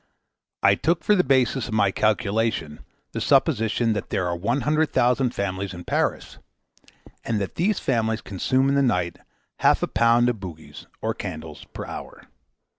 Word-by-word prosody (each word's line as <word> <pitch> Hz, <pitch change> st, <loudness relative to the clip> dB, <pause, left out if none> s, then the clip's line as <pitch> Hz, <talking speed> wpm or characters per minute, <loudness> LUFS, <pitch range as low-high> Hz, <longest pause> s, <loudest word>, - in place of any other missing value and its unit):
I 100 Hz, -, +6 dB
took 165 Hz, -, 0 dB
for 210 Hz, -, +4 dB
the 185 Hz, -3 st, +4 dB
basis 130 Hz, -2 st, +2 dB
of 110 Hz, -, -3 dB
my 100 Hz, -3 st, +3 dB
calculation 105 Hz, -6 st, 0 dB, 0.3 s
the -, -, -4 dB
supposition 115 Hz, -5 st, +2 dB
that 105 Hz, -, -4 dB
there 95 Hz, -, -1 dB
are 85 Hz, -, -1 dB
one 115 Hz, +10 st, -1 dB
hundred 155 Hz, +3 st, +1 dB
thousand 125 Hz, 0 st, +2 dB
families 95 Hz, -1 st, -3 dB
in 85 Hz, -, -8 dB
Paris, -, -, -2 dB, 0.8 s
and 115 Hz, -2 st, -1 dB
that 100 Hz, -, -4 dB
these 195 Hz, +4 st, +1 dB
families 110 Hz, -3 st, 0 dB
consume 130 Hz, +8 st, 0 dB
in 140 Hz, -, +2 dB
the 140 Hz, -, +3 dB
night 90 Hz, -10 st, 0 dB, 0.4 s
half -, -, +3 dB
a -, -, +1 dB
pound 115 Hz, +1 st, +3 dB
of 120 Hz, -2 st, 0 dB
bougies, 80 Hz, -6 st, -10 dB, 0.2 s
or -, -, 0 dB
candles, -, -, -7 dB
per -, -, -8 dB
hour. -, -, -9 dB
115 Hz, 170 wpm, -24 LUFS, 100-130 Hz, 0.8 s, I